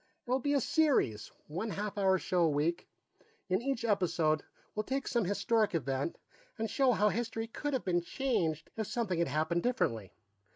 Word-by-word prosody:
"It'll 255 +2 +2
be 285 +2 +1
a - - +4
series, 255 - +2
one 185 +9 -4
half 205 0 -3
hour 190 -2 +3
show 180 -1 0
a - - +3
week; 155 +4 0 0.6
in 185 +3 +2
each 265 -2 -1
episode, 170 -7 +2 0.3
we'll 215 - -1
take 265 +4 -2
some 235 -5 +1
historic 210 +1 +1
event 135 0 -1 0.4
and 225 0 -1
show 250 +4 +3
how 210 0 +3
history 225 0 -2
could 290 +6 -4
have 260 - -1
been 175 -2 +2
changed 170 - -1
if 220 -2 -2
something 200 -8 -1
had 170 - +2
happened 155 +5 0
differently. 115 - 0
205 Hz, 175 wpm, -32 LUFS, 170-235 Hz, 0.6 s, a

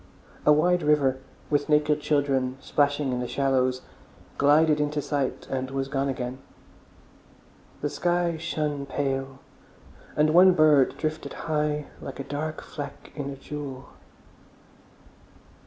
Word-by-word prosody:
A - - +8
wide 175 +4 +4
river, 145 -3 +2 0.3
with 145 0 +1
naked 150 0 +3
children 135 -3 +1
splashing 145 -1 +1
in 125 - -1
the 125 - -3
shallows, 130 -2 +1 0.6
glided 150 +2 +4
into 150 0 0
sight 140 -2 -2
and 130 -1 -3
was 135 0 -3
gone 140 0 0
again. 130 -1 -4 1.4
The 145 - -1
sky 175 -1 0
shone 150 -3 -3
pale, 135 -1 -2 0.8
and 150 +1 +3
one 180 +3 +7
bird 155 -5 +4
drifted 155 0 -3
high 150 -1 0 0.2
like 135 - -8
a - - -3
dark 155 +3 -4
fleck 145 -2 -8
in 145 -2 -4
a 140 - -5
jewel. 135 -1 -7
145 Hz, 125 wpm, -26 LUFS, 135-150 Hz, 1.4 s, A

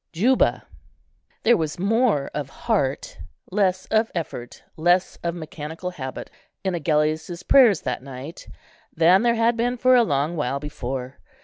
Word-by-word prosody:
JUBA. 245 +10 +2 0.8
There 240 +1 +5
was 155 -2 -3
more 205 - +1
of 145 -2 -4
heart, 135 0 -2 0.3
less 185 -2 +1
of 220 +1 +2
effort, 125 -7 -6
less 175 +3 +2
of 170 0 -3
mechanical 160 +2 -6
habit, 130 -6 -7 0.3
in 190 -1 -1
Agellius's 160 +2 -1
prayers 230 - +5
that - - -3
night, 135 +4 -9 0.4
than 175 +4 +4
there 235 0 +2
had 230 +1 +2
been 245 +2 -1
for 255 +1 +4
a 250 - +6
long 150 -4 0
while 140 -3 -1
before. 130 -2 -6
170 Hz, 140 wpm, -23 LUFS, 145-215 Hz, 0.8 s, a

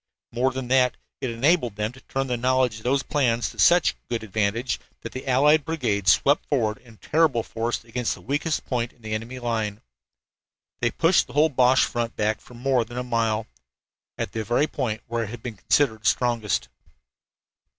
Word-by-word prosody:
More 125 +3 +1
than 130 -1 -5
that, 130 -1 +3 0.2
it 130 - -2
enabled 120 - +2
them 105 +2 -2
to 135 +1 -16
turn 135 0 -2
the 125 -2 -1
knowledge 125 -1 +1
of 110 - -12
those 135 +2 +1
plans 120 -5 0
to - - -15
such 175 -1 +5 0.2
good 115 -2 -2
advantage 110 +4 -1 0.2
that - - -7
the 130 +1 -7
allied 145 +4 +4
brigades 110 - +1
swept 140 - +3
forward 110 -7 0
in 115 -3 -18
terrible 150 -6 +2
force 115 +1 -3
against 120 +1 -2
the - - -15
weakest 150 +4 -1
points 120 -2 -2
in 120 - -26
the 110 0 -4
enemy 115 +4 -4
line. 110 -4 -2 1.0
They 120 - +2
pushed 165 +8 +3
the - - -12
whole 150 +2 +4
Boche 130 -2 +4
front 120 -1 -3
back 105 +1 0
for 125 - -15
more 125 0 +1
than 120 +2 -10
a 125 - -1
mile 115 -3 0 0.7
at - - -3
the 110 - -3
very 120 +6 +2
point 115 -8 -3
where 115 0 -2
it - - -8
had 115 0 -9
been 115 -4 -6
considered 110 +2 +1
strongest! 120 -5 +1
120 Hz, 190 wpm, -24 LUFS, 115-130 Hz, 1.0 s, such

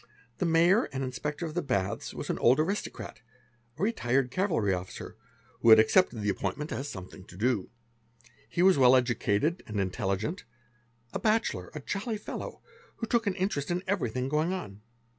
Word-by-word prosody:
The 180 - +1
fayor 170 +6 +4
and 135 0 -3
Inspector 150 +5 -3
of 155 - -5
the 175 - 0
Baths 100 - -2
was - - -4
an - - -3
old 125 +5 +5
aristocrat, 195 +7 -3 0.6
a - - -3
retired 135 - +1
cavalry 155 - +1
F 90 - 0
officer, 90 - -9 0.4
who 115 - +3
had 110 - +11
accepted 115 - +4
the 105 - +1
appointment 100 +10 -3
as 140 +2 -3
something 95 0 -9
to 90 - -14
do. 115 -2 0 0.8
He 175 - +1
was. 185 -5 +5
well 130 0 +7
educated 125 - +1
and 105 -2 -3
intelligent, 100 - -2 0.7
a - - -2
bachelor, 215 - 0
a 150 - -5
jolly 210 - -3
fellow, - - -7 0.3
who 230 - -4
took 230 -1 +1
an 195 - +1
interest 180 -7 -1
in 175 +1 -1
everything 130 - -1
going 155 +5 +1
on. 105 - -6
140 Hz, 175 wpm, -29 LUFS, 110-180 Hz, 0.8 s, had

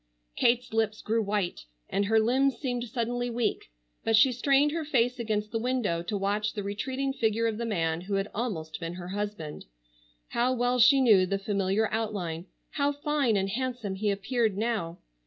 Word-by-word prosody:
Kate's 240 -1 +2
lips 220 -1 0
grew 225 +1 0
white, 200 - -2 0.2
and 200 +1 0
her 220 +2 +4
limbs 255 +3 +2
seemed 245 -3 -2
suddenly 245 +1 -2
weak, 235 - -1 0.3
but 225 - +3
she 255 +4 +6
strained 275 +4 +3
her 325 +1 -2
face 250 -4 +1
against 215 -2 -2
the 225 - -1
window 235 -8 0
to 190 +4 -3
watch 205 +2 -1
the 205 - -4
retreating 260 +7 -2
figure 225 -2 +1
of 225 -1 -1
the 235 - -2
man 165 -5 0
who 200 +2 -3
had 195 +1 0
almost 185 -9 -3
been 165 0 -5
her 180 0 -7
husband. 205 -6 -5 0.6
How 245 +2 +1
well 245 0 +1
she 270 +3 +7
knew 205 -7 +5
the 195 +1 0
familiar 195 +1 0
outline. 190 -6 -3 0.2
How 285 -1 +1
fine 285 -6 +1
and 195 0 0
handsome 240 -2 -3
he 205 +2 -1
appeared 210 +1 0
now! 210 -7 -1
220 Hz, 180 wpm, -28 LUFS, 200-245 Hz, 0.6 s, she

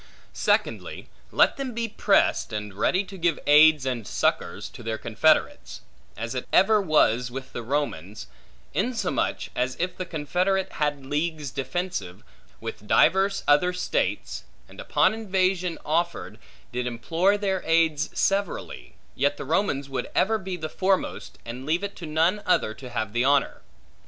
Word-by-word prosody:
Secondly, - - -1 0.2
let - - +3
them 265 -4 -4
be 230 0 -1
prest, 205 - +2
and 105 -2 -5
ready 180 - +1
to 195 -1 -11
give 170 -2 +1
aids 150 -1 +6
and 120 -6 -3
succors, 60 0 -1
to - - -12
their 110 -1 -3
confederates; 120 +9 +1 0.4
as 115 +2 -4
it 125 - -4
ever 210 +2 +5
was 125 - +2
with 130 +1 -8
the - - -4
Romans; 110 - -3 0.5
insomuch, 235 +4 -1
as 125 +1 -1
if 180 +1 -1
the 185 - -4
confederate 180 +5 0
had 145 -2 0
leagues 150 0 -2
defensive, 130 - -4 0.4
with - - -7
divers 195 +1 +3
other 165 +5 +4
states, 180 - -2 0.2
and, - - -15
upon - - +2
invasion 185 -5 0
offered, 165 +3 -1 0.3
did 125 0 -2
implore 165 - +1
their 195 -2 -1
aids 160 -2 +2
severally, 195 -1 -2 0.2
yet 145 - 0
the - - -6
Romans 145 -3 0
would 130 -2 -4
ever 220 +3 +2
be 190 -2 -5
the 160 -2 -4
foremost, 190 +4 -1
and 120 +3 -7
leave 165 +7 0
it 200 0 -4
to 170 - -7
none 165 +7 +1
other 110 -11 +2
to 125 +2 -10
have 110 -3 -3
the 120 +1 +1
honor. 140 +1 +2
155 Hz, 150 wpm, -25 LUFS, 130-190 Hz, 0.5 s, aids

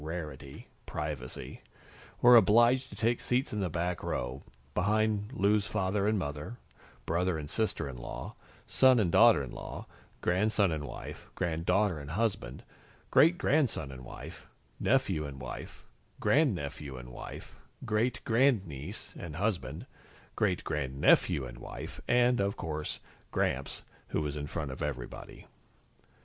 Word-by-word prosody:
rarity 75 -4 -6 0.2
privacy 75 -5 -5 0.6
were 120 0 +9
obliged 120 +4 +5
to - - -10
take 115 +1 +1
seats 125 0 0
in 105 - -1
the 95 -3 0
back 85 +2 -2
row, 60 +2 -3 0.3
behind 105 +3 +1
Lou's 105 -3 +2
father 100 0 0
and 110 0 +2
mother, 75 +6 -4 0.5
brother 90 +1 +1
and 75 -2 -5
sister 110 -9 0
in 65 - -6
law, - - -6 0.3
son 130 -1 +5
and 95 -6 +2
daughter 115 -10 +6
in 65 - -7
law, - - -7 0.3
grandson 100 +1 +2
and 75 -2 -2
wife, - - -8
granddaughter 90 +2 +1
and 70 -1 -8
husband, 90 - -1 0.5
great 165 +3 +6
grandson 135 - +1
and 65 -1 -9
wife, - - -10 0.3
nephew 95 -12 +2
and 70 -2 -8
wife, 65 -1 -8 0.3
grandnephew 75 - +1
and 60 0 -9
wife, - - -9 0.3
great 110 +2 0
grandniece 110 - 0
and 80 -3 -6
husband, 85 -8 -2 0.5
great - - +1
grandnephew 70 -1 +2
and - - -9
wife 80 +3 -8
and, 125 0 +4
of 100 +1 0
course, 75 -1 -4 0.3
Gramps, 70 +2 -1 0.2
who 75 - -1
was 75 -1 -3
in 75 -1 -4
front 75 -3 -4
of 65 - -8
everybody. 70 -5 -5
90 Hz, 135 wpm, -31 LUFS, 70-110 Hz, 0.6 s, were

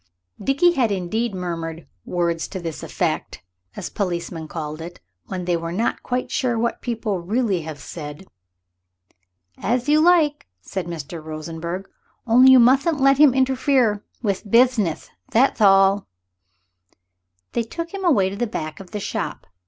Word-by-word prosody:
Dickie 280 +6 +4
had 255 -9 +1
indeed 200 +4 -1
murmured 165 -2 -5 0.2
"words 170 -2 -1
to 190 - -6
this 165 -3 -5
effect," - - -3 0.3
as - - -6
policemen 170 -4 -3
call 155 -1 -6
it 175 +2 -9 0.3
when 180 -2 -4
they 175 - +1
are 165 0 -3
not 215 +7 -1
quite 250 0 -3
sure 245 -3 0
what 235 +1 -1
people 220 -5 -2
really 200 0 0
have 155 -1 -7
said. 150 +3 -8 1.3
"Ath 245 +3 0
you 300 +1 +5
like," 315 -3 +3
said 180 - -5
Mr. 165 -1 -6
Rosenberg, 165 +4 -5 0.4
"only 250 +3 +7
you 260 - +8
muthn't 275 +6 +4
let 275 +1 +4
him 290 -4 +6
interfere 260 -5 +2 0.2
with 200 -3 -1
bithneth; 230 -7 +2 0.2
thath 240 0 +2
all." 195 0 +5 1.4
They 235 - 0
took 335 - -6
him 390 -1 -5
away 205 - +3
to - - -5
the 240 +3 -1
back 155 -7 -5
of 190 -2 -11
the 210 - -4
shop. - - -4
200 Hz, 150 wpm, -22 LUFS, 170-255 Hz, 1.4 s, you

